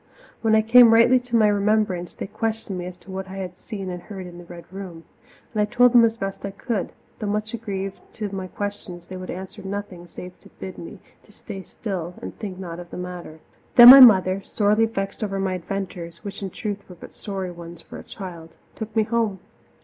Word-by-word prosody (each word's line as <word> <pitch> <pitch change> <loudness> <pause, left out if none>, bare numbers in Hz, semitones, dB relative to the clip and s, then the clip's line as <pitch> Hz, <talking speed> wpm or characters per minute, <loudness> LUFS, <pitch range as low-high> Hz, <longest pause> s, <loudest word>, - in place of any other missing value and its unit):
When 220 -1 +3
I 220 - +4
came 230 0 +7
rightly 240 +3 +6
to 245 -1 -4
my 220 -2 +5
remembrance, 205 -3 0
they - - -5
questioned 220 -1 -3
me 175 - -5
as 180 0 -9
to 185 +2 -14
what 190 0 -5
I 190 - -8
had 185 -2 -5
seen 195 -2 -6
and 180 -1 -6
heard 190 0 -8
in 175 0 -10
the 175 - -12
Red 170 0 -11
Room. 185 -4 -8 0.5
And 215 - +1
I - - +3
told 245 +3 +4
them 240 -1 +8
as 225 0 +2
best 195 -3 -5
I 200 - -3
could, 200 0 -3 0.3
though 215 - -3
much 210 +2 -2
aggrieved 195 -4 -4
that - - -27
to 210 -2 -5
my 190 -1 -4
questions 190 -3 -6
they 185 - -9
would 185 0 -8
answer 190 +3 -7
nothing 195 -3 -6
save 180 +1 -10
to - - -18
bid 190 -1 -8
me 170 +5 -9 0.3
to - - -20
stay 205 -2 -9
still 180 -4 -6
and 95 - -8
think 195 -3 -6
not 175 -2 -7
of 175 -1 -10
the - - -8
matter. 180 -3 -8 0.3
Then 240 0 +13
my 275 - +12
mother, 195 -6 +7
sorely 210 +2 +2
vexed 195 -1 -4
over 195 -2 -2
my 190 -1 -1
adventures 180 -2 -6
which 200 -1 -7
in 195 - -4
truth 205 +2 -4
were 180 - -10
but - - -13
sorry 190 -3 -5
ones 170 -1 -10
for - - -11
a - - -10
child 170 -5 -9 0.2
took 220 0 -7
me 220 - +4
home. 220 -3 -1
195 Hz, 225 wpm, -23 LUFS, 180-215 Hz, 0.5 s, Then